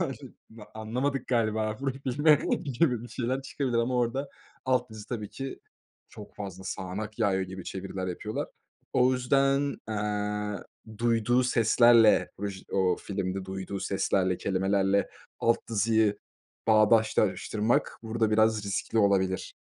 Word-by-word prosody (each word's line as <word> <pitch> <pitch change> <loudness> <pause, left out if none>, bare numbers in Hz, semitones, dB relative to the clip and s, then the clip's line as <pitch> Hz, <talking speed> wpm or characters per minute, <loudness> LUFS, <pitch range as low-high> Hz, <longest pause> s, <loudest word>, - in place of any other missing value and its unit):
yani, - - -2 0.3
ma 110 -2 -12
anlamadık 125 +5 -2
galiba 110 -3 0
burayı 135 -1 -3
filme 145 +4 +4 0.3
gibi 125 -3 +1
bir 120 - -9
şeyler 130 +2 -2
çıkabilir 130 -3 -2
ama 120 +2 0
orada 125 +4 0 0.4
alt 125 -2 +1
yazı 110 -1 -10
tabii 110 -4 -4
ki: 135 0 -6 0.5
"Çok 105 -1 -12
fazla 95 -2 -7
sağanak 100 +4 -5
yağıyor." 95 -3 +2
gibi 95 -1 -7
çeviriler 95 0 -5
yapıyorlar. 105 +5 -4 0.5
O 130 +1 +4
yüzden, 135 +2 +2
eee, 105 -1 -2 0.4
duyduğu 120 +1 +2
seslerle 115 -1 +5
vıj 100 -2 -4
o 95 -2 +2
filmde 95 -1 -4
duyduğu 95 +1 -5
seslerle, 95 -2 0
kelimelerle 95 +1 +1 0.3
alt 115 - +3
yazıyı 110 -1 +2 0.5
bağdaştırmak 110 0 +2
burada 110 -1 0
biraz 110 -1 +3
riskli 100 +3 -2
olabilir. 95 -2 +1
110 Hz, 125 wpm, -28 LUFS, 100-120 Hz, 0.5 s, seslerle